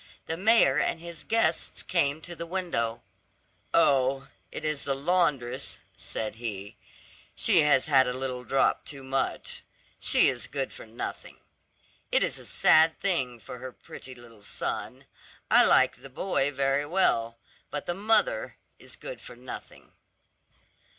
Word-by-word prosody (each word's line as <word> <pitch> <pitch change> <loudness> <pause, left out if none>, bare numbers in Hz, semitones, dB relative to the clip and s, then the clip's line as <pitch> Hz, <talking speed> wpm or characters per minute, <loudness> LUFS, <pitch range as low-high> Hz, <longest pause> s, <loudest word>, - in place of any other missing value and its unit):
The 160 - -2
mayor 190 - +4
and 160 +3 0
his 170 -1 -8
guests 225 -8 +1
came 155 -3 +1
to 175 +2 -8
the 170 0 -6
window. 165 -11 -2 0.7
"Oh, 135 0 +2 0.2
it 155 - -6
is 155 -2 -2
the 135 - 0
laundress," 140 -5 0 0.2
said 110 -2 -3
he; 105 -4 -6 0.6
"she - - +5
has 145 -3 +4
had 135 -3 +4
a - - 0
little 130 -1 -4
drop 135 +3 +1
too 140 -2 -7
much. 135 0 -2 0.4
She - - +5
is 125 -2 -1
good 135 -2 -4
for - - -11
nothing. 110 +2 -7 0.7
It - - +3
is - - -2
a - - -11
sad 160 +1 +4
thing 130 -11 0
for 125 - -10
her 130 +1 -7
pretty 130 +1 -11
little 115 -3 -15
son. 100 - -4 0.5
I - - +8
like - - +4
the 135 - -11
boy 140 0 0
very 135 +1 0
well; 115 -10 +1 0.3
but 145 - -4
the 175 - -1
mother 225 - +1 0.2
is - - -9
good - - -9
for - - -10
nothing." - - -10
140 Hz, 150 wpm, -27 LUFS, 125-170 Hz, 0.7 s, I